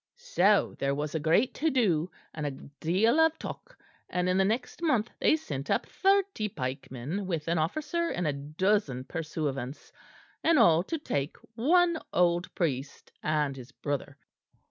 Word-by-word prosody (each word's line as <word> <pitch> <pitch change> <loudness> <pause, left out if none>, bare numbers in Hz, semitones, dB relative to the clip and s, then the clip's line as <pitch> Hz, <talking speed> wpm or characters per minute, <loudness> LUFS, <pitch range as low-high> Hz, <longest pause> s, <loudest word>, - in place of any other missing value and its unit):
"So - - +2
there 140 0 +1
was 145 0 -3
a 160 - 0
great 165 - +3
to 320 +3 +1
do, 185 - +2 0.2
and 150 -2 -3
a - - 0
deal 170 - 0
of 320 0 +4
talk; - - -8 0.3
and 180 0 0
in 180 - +2
the - - +5
next 230 - -2
month 245 -9 +1
they - - +4
sent 145 - -5
up - - +1
thirty 390 - +1
pikemen 135 +5 -4
with 165 -4 -2
an 165 0 +1
officer 310 - -1
and 175 - -2
a 150 - +1
dozen 150 - 0
pursuivants, 145 -4 -4 0.5
and 330 -1 +4
all 170 - +6
to 325 - -2
take 145 - -3 0.2
one 335 +8 +3
old 175 0 +2
priest 145 -5 -3
and 150 -3 0
his 130 0 -11
brother. 145 -2 -4
170 Hz, 160 wpm, -29 LUFS, -, 0.5 s, all